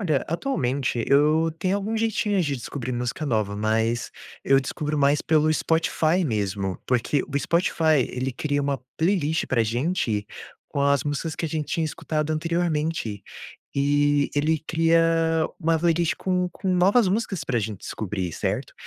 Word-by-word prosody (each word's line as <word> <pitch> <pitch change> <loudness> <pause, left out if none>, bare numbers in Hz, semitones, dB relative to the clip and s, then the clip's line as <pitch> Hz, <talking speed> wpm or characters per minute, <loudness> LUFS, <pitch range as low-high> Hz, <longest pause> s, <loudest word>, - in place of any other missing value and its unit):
Olha, 155 -9 0
atualmente 135 - -1
eu 155 +3 +4
tenho 185 +3 0
algum 215 +3 -2
jeitinho 220 -3 +1
de 145 -5 -1
descobrir 125 +1 -5
música 125 +5 -3
nova. 110 -5 0
Mas, 110 +2 0 0.3
eu 135 0 +4
descubro 150 +2 -3
mais 145 +1 +3
pelo 155 0 +3
Spotify 160 +2 +1
mesmo, 100 - -2
porque 130 +3 +1
o 140 0 -2
Spotify 160 -4 +2
ele 130 +1 -3
cria 145 +3 -1
uma 140 -1 -1 0.2
playlist 160 -2 +1
para 120 -3 +2
gente 115 - -1 0.4
com 140 - -3
as 140 -2 +3
músicas 150 +2 -2
que 170 - -3
a - - -4
gente 155 -1 -3
tinha 165 - 0
escutado 155 0 -3
anteriormente, 155 - -1 0.5
e 145 +1 +2
ele 155 +2 +2
cria 165 0 +3 0.6
uma 165 0 +2
playlist 170 0 +2
com 180 -1 0
com 190 - -5
novas 195 +4 +4
músicas 195 -2 -1
para 125 -3 0
gente 105 -2 -4
descobrir, 95 -4 -4
certo? - - -3
150 Hz, 155 wpm, -24 LUFS, 125-165 Hz, 0.6 s, eu